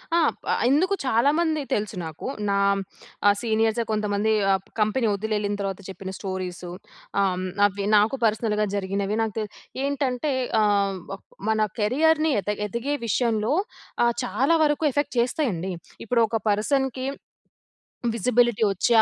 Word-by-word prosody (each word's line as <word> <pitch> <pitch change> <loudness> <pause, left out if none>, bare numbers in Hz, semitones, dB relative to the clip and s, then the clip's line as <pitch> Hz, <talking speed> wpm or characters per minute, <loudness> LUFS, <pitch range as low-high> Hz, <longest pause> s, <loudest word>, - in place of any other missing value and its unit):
ఆ! - - +5 0.2
ప్ - - -47 0.3
ఎందుకు 360 +9 +3
చాలామంది 300 +6 +2
తెలుసు 210 0 -1
నాకు. 160 +5 -6 0.2
నా 200 - +2 0.7
ఆహ్, 205 - +6
సీనియర్సే 225 0 +1
కొంతమంది, 210 0 0 0.2
ఆప్ 190 0 -3
కంపెనీ 220 +3 +2
వదిలెళ్ళిన 205 0 -1
తర్వాత 195 -1 -3
చెప్పిన 190 0 -7
స్టోరీసు, 185 -2 -5 0.5
ఆహ్, 190 -2 +2
హ్మ్. 185 - -3 0.2
అవి 200 0 -1
నాకు 210 +5 +3
పర్సనల్‌గా 215 -1 +1
జరిగినవి 200 +1 -1
నాకు 220 -2 -3
తె 215 - -1 0.4
ఏంటంటే, 280 0 -1 0.3
ఆహ్, 200 -2 +2
వక్ 195 - -8 0.2
మన 220 0 +2 0.2
కెరియర్‌ని 310 +8 +3
ఎద 205 - -6 0.2
ఎదిగే 235 +7 -2
విషయంలో, 225 +2 +1 0.5
ఆహ్, 235 - +3
చాలా 255 - +1
వరకు 295 +1 0
ఎఫెక్ట్ 285 0 -1
చేస్తాయండి. 230 - 0 0.3
ఇప్పుడు 235 +2 +1
ఒక 225 +1 0
పర్సన్‌కి 260 +5 0 1.1
విజిబిలిటీ 240 0 +2
వచ్చి, 195 +4 0
220 Hz, 135 wpm, -24 LUFS, 200-255 Hz, 1.1 s, ఆహ్